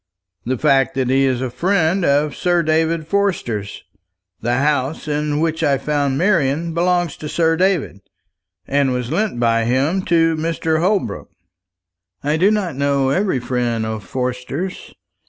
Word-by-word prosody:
"The 130 +1 0
fact 135 -2 +2
that 130 -1 0
he 135 +1 +3
is 130 -2 0
a 130 - -3
friend 180 +3 +1
of 145 -1 +2
Sir 175 -1 +1
David 160 +1 +1
Forster's. 160 - -2 0.6
The 120 +2 0
house 145 +1 0
in 150 0 -1
which 160 0 -1
I 140 -1 +2
found 145 -2 -1
Marian 165 -3 +1
belongs 175 -2 +1
to 150 - -7
Sir 165 0 +2
David, 165 - 0 0.7
and 140 -1 +1
was 125 -1 -3
lent 210 - -1
by 115 -1 +2
him 140 +10 +1
to 165 -1 +3
Mr. 160 0 -1
Holbrook." 180 - -1 0.9
"I 150 +2 +1
do 185 +5 +3
not 200 -8 -1
know 140 -1 +1
every 185 -3 +1
friend 120 -2 -1
of 110 -1 -4
Forster's. 125 - -4
150 Hz, 150 wpm, -19 LUFS, 130-170 Hz, 0.9 s, he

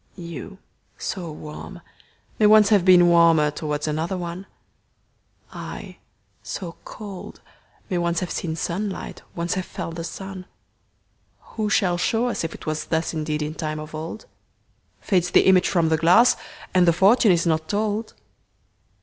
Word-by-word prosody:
You, 170 +1 -8 0.4
so 175 -5 -4
warm, 155 +4 -9 0.6
may 210 - +6
once 215 -1 +6
have 205 -3 +5
beenWarmer 170 -4 +5
towards 150 0 -3
another 160 +5 -2
one:I, 175 +2 -11 0.4
so 175 -3 -6
cold, 200 -4 -9 0.5
may 180 - -1
once 170 -1 0
have 180 - -4
seenSunlight, 175 +4 -4
once 170 0 -1
have 185 -1 -3
felt 165 - -6
the 165 - -4
sun:Who 195 +3 -9
shall 185 -4 +2
show 235 +6 +1
us 235 - -2
if 165 - -4
it - - -13
wasThus 160 +2 -2
indeed 155 -1 -2
in 150 +1 -4
time 155 -1 -4
of 155 +1 -9
old? 160 +7 -6 0.8
Fades 180 -3 +1
the - - +5
image 185 -1 +5
from 170 -3 +2
the 160 - +2
glass, 175 +10 +5 0.4
And 180 -1 +4
the 170 - +6
fortune 205 +5 +5
is 170 -1 +2
not 160 -1 0
told. 215 +1 -2
175 Hz, 140 wpm, -23 LUFS, 160-195 Hz, 0.8 s, may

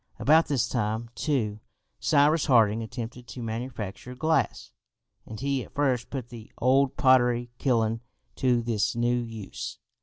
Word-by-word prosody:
About 160 +3 +4
this 140 -5 +1
time, 115 0 -2
too, 115 -10 -1 0.4
Cyrus 150 +1 +3
Harding 115 -4 +4
attempted 120 +2 -7
to 125 - -7
manufacture 115 0 -5
glass 155 -3 0 0.6
and 110 -1 -8
he 135 -1 -1
at - - -16
first 135 -4 0
put 130 -4 -5
the 115 -2 -11
old 130 +2 +3
pottery 120 -3 +3
kiln 115 -3 +1 0.4
to 125 -2 +2
this 115 -3 0
new 120 +1 +1
use. 115 -4 -7
120 Hz, 140 wpm, -27 LUFS, 115-135 Hz, 0.6 s, About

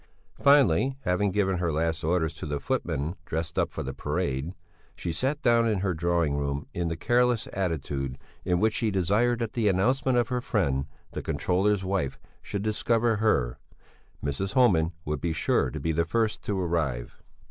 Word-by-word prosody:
Finally, 135 - +4
having 95 +1 +1
given 95 -2 +1
her 85 -2 0
last 80 +2 -1
orders 80 0 +1
to 80 - -7
the 75 -1 -2
footman 70 +3 -2
dressed 80 +1 -3
up - - +1
for - - -4
the - - -4
parade, 70 +6 -2 0.4
she 85 - -3
sat 135 - -1
down 115 -1 +4
in 105 -4 0
her 95 -2 0
drawing 85 -2 +1
room 70 0 -2
in 85 -1 -1
the 80 0 -3
careless 120 +2 +2
attitude 70 -8 -2 0.3
in 90 -1 +1
which 110 +2 +2
she 115 - 0
desired 105 +6 +2
that 115 -2 -3
the 115 -3 +1
announcement 125 +7 +2
of 120 0 +2
her 125 -1 -1
friend, 70 - 0 0.2
the - - -4
controller's 95 +2 +1
wife, 95 -8 -1 0.2
should 100 -1 -4
discover 115 +1 +1
her; 65 - +1 0.7
Mrs. 85 +8 -2
Homan 90 -11 +4
would 75 -2 -2
be 85 -2 0
sure 70 -3 +1
to - - -5
be 80 - -1
the 80 +1 +2
first 110 +5 0
to 100 -2 -1
arrive. 80 -9 -2
90 Hz, 180 wpm, -27 LUFS, 80-110 Hz, 0.7 s, Finally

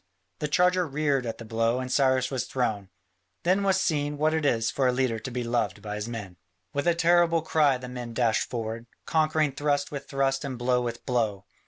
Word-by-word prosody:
The 150 - -1
charger 180 +2 +3
reared 140 -3 0
at 115 - -4
the 115 - -9
blow 115 +2 0
and 130 0 -4
Cyrus 130 -1 +2
was 130 -2 -1
thrown. 110 -8 -2 0.5
Then 185 +3 +3
was 195 -1 +2
seen 145 -5 0
what 155 +2 +2
it 160 -2 +1
is 115 -2 +1
for 130 +2 +1
a - - +4
leader 125 -3 0
to 130 - -6
be 125 0 -3
loved 120 0 -1
by 105 -1 -4
his 105 +1 -4
men. 100 -6 -7 0.4
With 145 +3 -1
a 170 - +4
terrible 170 -1 +3
cry 150 -4 +3
the 125 0 -8
men 120 -2 -7
dashed 115 -3 +1
forward, 115 -1 -4 0.2
conquering 155 -2 +2
thrust 145 +1 -1
with 140 -2 -6
thrust 135 0 0
and 135 -3 -4
blow 125 +1 +1
with 120 -1 -5
blow. 110 -6 -1
130 Hz, 210 wpm, -27 LUFS, 115-150 Hz, 0.5 s, a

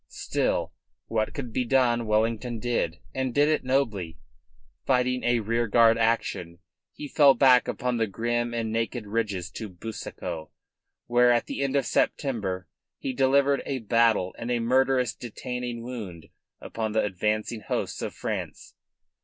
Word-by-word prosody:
Still, - - -1 0.3
what 110 -1 -1
could 125 -6 -5
be 125 - +1
done 120 -2 +2
Wellington 115 +2 0
did, 110 -8 -1 0.2
and 130 -2 -2
did 145 +1 +5
it 155 - +1
nobly. 110 -11 -1 0.7
Fighting 125 -1 +1
a 120 -1 +2
rearguard 115 +1 +3
action, 110 -7 0 0.3
he 145 - -8
fell 140 -1 +6
back 130 -2 +5
upon 125 -2 -1
the 115 -1 +1
grim 120 +3 -1
and 115 -2 -2
naked 115 0 -2
ridges 100 -5 -2
of 95 -5 -8
Busaco, 85 -7 -6 0.6
where 120 0 +4
at 120 -1 +2
the - - -4
end 140 0 0
of 140 -3 +2
September 100 -9 -1 0.3
he 130 - -4
delivered 135 +1 +3 0.3
battle 115 -5 +3
and 115 - -4
a 120 - +1
murderous 125 0 +2
detaining 125 0 -5
wound 105 -10 -7 0.3
upon 110 -2 -4
the 110 - +2
advancing 105 +3 -1
hosts - - -3
of - - -4
France. - - -5
115 Hz, 145 wpm, -26 LUFS, 110-125 Hz, 0.7 s, fell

